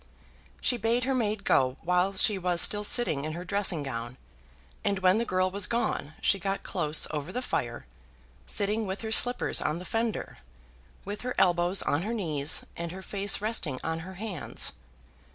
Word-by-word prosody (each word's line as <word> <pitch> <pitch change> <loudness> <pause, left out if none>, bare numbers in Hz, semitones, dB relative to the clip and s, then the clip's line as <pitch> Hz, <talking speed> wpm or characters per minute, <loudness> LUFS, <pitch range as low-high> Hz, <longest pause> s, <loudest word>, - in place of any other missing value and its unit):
She 245 - +2
bade 235 +2 +1
her 265 +2 0
maid 215 -4 -1
go 130 0 +2
while 180 +3 +2
she 195 +1 +1
was 175 -1 0
still 205 +3 +3
sitting 205 - +3
in 155 +1 -3
her 175 +2 -6
dressing 185 -5 +1
gown; 120 -2 -5 0.7
and 200 - +1
when 190 +2 +3
the 235 - 0
girl 185 -2 +1
was 200 0 +2
gone 195 -9 -2
she 195 - +2
got 195 +2 -2
close 155 -4 +3
over 150 -2 -4
the 250 - -2
fire, 120 - -3 0.6
sitting 210 +1 +1
with 190 +1 -4
her 220 -1 -4
slippers 245 +2 +2
on 155 - 0
the 180 - -8
fender, 225 - -2 0.7
with 205 +1 -5
her 250 0 -4
elbows 175 0 +3
on 145 - 0
her 220 +5 -3
knees, 155 -7 +1
and 170 0 -5
her 190 +1 -8
face 200 0 +1
resting 185 - -2
on 160 0 -2
her 185 +3 -9
hands. 195 -5 -2
190 Hz, 180 wpm, -28 LUFS, 160-210 Hz, 0.7 s, still